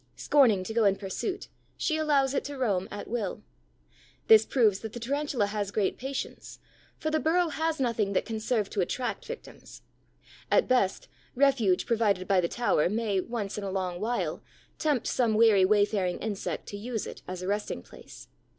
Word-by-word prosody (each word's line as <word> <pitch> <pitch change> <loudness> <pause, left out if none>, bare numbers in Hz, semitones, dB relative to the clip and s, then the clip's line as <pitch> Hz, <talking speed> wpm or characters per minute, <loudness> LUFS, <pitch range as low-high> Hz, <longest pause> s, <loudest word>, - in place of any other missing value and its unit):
Scorning 245 -10 +3
to 220 - -5
go 230 0 +2
in 195 -1 +4
pursuit, 205 - -4 0.3
she 315 - 0
allows 285 -4 +2
it - - 0
to 285 -1 -6
roam 200 -8 0
at 205 - -7
will. 215 -2 -3 0.9
This 445 -1 +8
proves 215 -7 +3
that 220 -1 -7
the 240 - -6
Tarantula 275 -2 -1
has 205 -1 -3
great 200 -1 -1
patience, 270 +1 -5 0.4
for 310 - -2
the 315 - +2
burrow 335 +2 +2
has 320 +1 -1
nothing 230 -6 0
that - - +1
can 225 -2 -4
serve 215 -2 0
to 200 - 0
attract 245 +7 -3
victims. 480 0 -10 0.7
At - - +3
best, 245 -7 +1 0.3
refuge 250 -9 +3
provided 210 -5 +1
by 195 -2 +4
the 170 - 0
tower 175 -7 +1
may, 210 -2 0
once 210 -2 -4
in - - -6
a 195 - -3
long 185 -2 -2
while, 235 +4 -2 0.4
tempt 295 -6 +1
some 230 -4 +1
weary 215 -4 +6
wayfaring 205 -2 +2
insect 210 -3 -4
to 205 - -6
use 225 +1 -4
it - - -9
as 185 0 -5
a - - -4
resting 205 +1 -2
place. - - -13
220 Hz, 180 wpm, -28 LUFS, 200-265 Hz, 0.9 s, This